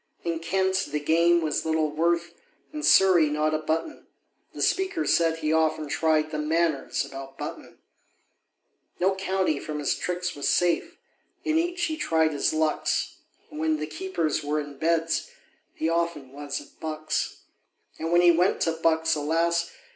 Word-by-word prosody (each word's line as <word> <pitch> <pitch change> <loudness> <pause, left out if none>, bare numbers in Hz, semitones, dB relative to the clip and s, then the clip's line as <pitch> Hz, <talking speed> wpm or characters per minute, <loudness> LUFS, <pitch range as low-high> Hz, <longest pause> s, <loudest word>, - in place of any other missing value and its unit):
In 165 -1 -2
Kent 190 +2 0
the 150 +1 -1
game 170 +3 +3
was 155 -2 -1
little 160 -1 0
worth, 170 +2 0 0.4
In 305 - -4
Surrey 185 - +5
not 155 +1 0
a 155 - +1
button; 160 - -3 0.4
The - - -3
Speaker 380 -3 +1
said 165 -1 +2
he 155 -1 -1
often 155 -1 +1
tried 155 +1 +1
The 155 - -3
Manors 155 -1 0
about 135 0 -9
Button. - - -7 1.2
No 190 +2 +3
county 190 -5 0
from 150 +1 -5
his 145 -2 0
tricks 180 0 -3
was 145 - -1
safe; 175 -1 +1 0.5
In 315 +1 +2
each 350 +1 -1
he 315 -1 -1
tried 160 - +2
his 145 - +1
lucks, 155 0 0 0.3
And 150 - -7
when 155 0 +1
the 150 - -3
keepers 160 -1 -2
were 150 +1 -1
in 145 -2 -7
Beds, 165 0 0 0.5
He 160 - -1
often 165 -5 -1
was 145 0 -5
at - - -16
Bucks. 155 -1 -3 0.6
And 165 +1 -3
when 175 0 +5
he 175 -1 +7
went 175 +3 +2
to 165 - +2
Bucks, 160 0 +1
alas! 165 +3 0
160 Hz, 160 wpm, -26 LUFS, 155-175 Hz, 1.2 s, he